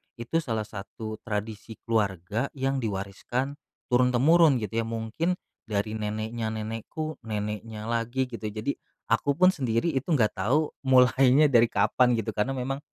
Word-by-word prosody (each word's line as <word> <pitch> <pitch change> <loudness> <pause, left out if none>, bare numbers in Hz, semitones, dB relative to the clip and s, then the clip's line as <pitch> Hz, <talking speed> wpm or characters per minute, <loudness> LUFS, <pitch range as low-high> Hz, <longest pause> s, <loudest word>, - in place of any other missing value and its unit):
itu 120 +7 -6
salah 115 -8 -2
satu 110 +1 -7
tradisi 110 0 -5
keluarga 105 +1 0
yang 135 0 0
diwariskan 115 - -3 0.3
turun-temurun 130 +6 +5
gitu 105 -3 -4
ya 115 - 0
mungkin 115 +11 -1 0.3
dari 105 +1 -1
neneknya 110 +2 -3
nenekku, 115 +9 -5
neneknya 105 0 -4
lagi 120 +3 0
gitu 115 -2 -8
jadi 110 +6 -2 0.3
aku 115 +5 +2
pun 185 0 +7
sendiri 120 +1 0
itu 135 -1 -2
enggak 110 -8 +2
tahu 135 +11 +2 0.2
mulainya 130 +2 +5
dari 120 -3 +6
kapan 125 -1 +3
gitu 115 -2 -1
karena 105 +5 0
memang 135 +2 -2
115 Hz, 140 wpm, -27 LUFS, 110-130 Hz, 0.3 s, pun